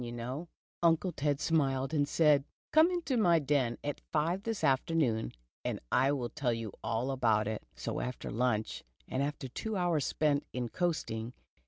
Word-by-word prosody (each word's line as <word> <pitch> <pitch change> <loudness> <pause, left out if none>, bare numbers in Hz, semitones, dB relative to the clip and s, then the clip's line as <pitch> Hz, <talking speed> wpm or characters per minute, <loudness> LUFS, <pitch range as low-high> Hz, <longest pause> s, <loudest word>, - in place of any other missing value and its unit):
you 120 - -5
know? 125 +8 -5
' - - -79
' - - -81
Uncle 170 +2 +3
Xed 145 -1 0
smiled, 135 -3 +1
and 145 -2 +2
said: 150 -4 +4 0.2
" - - -76
Come 315 +2 +7
into 345 -7 -1
my 175 -7 +5
den 140 -6 +1
at 145 0 -3
five 165 +5 +1
this 225 0 -3
afternoon, 130 - +2 0.3
and - - -2
I 135 - +4
will 125 -4 -1
tell 130 -4 0
you 115 -3 -4
all 115 +4 -1
about 110 -5 +2
it." 110 -1 -2
So - - -3
after 125 -1 -4
luncheon, 110 -2 0 0.2
and 130 - -1
after 140 -1 -2
tvvo 215 - -4
hours 175 -5 +1
spent 145 -2 +1
in 125 -1 -2
coasting 125 -10 -2
140 Hz, 185 wpm, -32 LUFS, 120-165 Hz, 0.3 s, Come